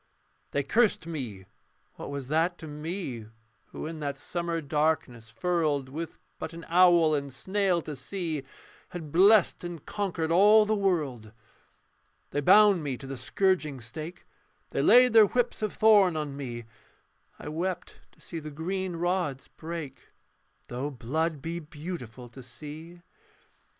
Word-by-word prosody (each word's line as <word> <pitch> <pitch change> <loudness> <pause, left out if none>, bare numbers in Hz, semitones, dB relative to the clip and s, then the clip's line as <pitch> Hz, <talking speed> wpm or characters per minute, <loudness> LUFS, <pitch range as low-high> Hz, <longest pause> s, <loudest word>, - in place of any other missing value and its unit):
They 140 - -1
cursed 215 - +2
me: 125 - -6 0.5
what - - -8
was 140 -2 -5
that 165 +3 +1
to 160 - -9
me 150 - -5 0.4
Who - - -7
in 160 0 -6
that 145 -2 -3
summer 170 -1 -3
darkness 150 -6 -1
furled, 150 -1 0
With 160 +4 -6 0.2
but 160 +1 -5
an 165 0 -9
owl 170 -2 +5
and 140 -2 -2
snail 190 +1 0
to 150 - -6
see, 165 -2 -4 0.5
Had 160 -4 -7
blessed 195 +3 +5
and 175 -4 -7
conquered 175 -6 -2
all 210 +5 +6
the 215 - +1
world? 150 - -1 1.0
They 145 - -1
bound 205 +3 +6
me 140 -4 -3
to 135 - -10
the 135 0 -5
scourging 155 +2 0
stake, 155 +9 -8 0.5
They - - 0
laid 250 -1 +6
their 220 -2 +8
whips 245 +2 -1
of 215 - -1
thorn 205 -6 +5
on 150 -2 -3
me; 120 -4 -6 0.7
I - - -9
wept 180 +3 -4
to - - -25
see 165 - -7
the 155 -1 -7
green 180 +4 -3
rods 175 -5 -1
break, 165 -3 -7 0.6
Though 125 +4 -3
blood 150 +4 -2
be 170 +1 -3
beautiful 150 -6 -8
to 130 +3 -12
see. 155 +7 -10
160 Hz, 145 wpm, -28 LUFS, 140-180 Hz, 1.0 s, their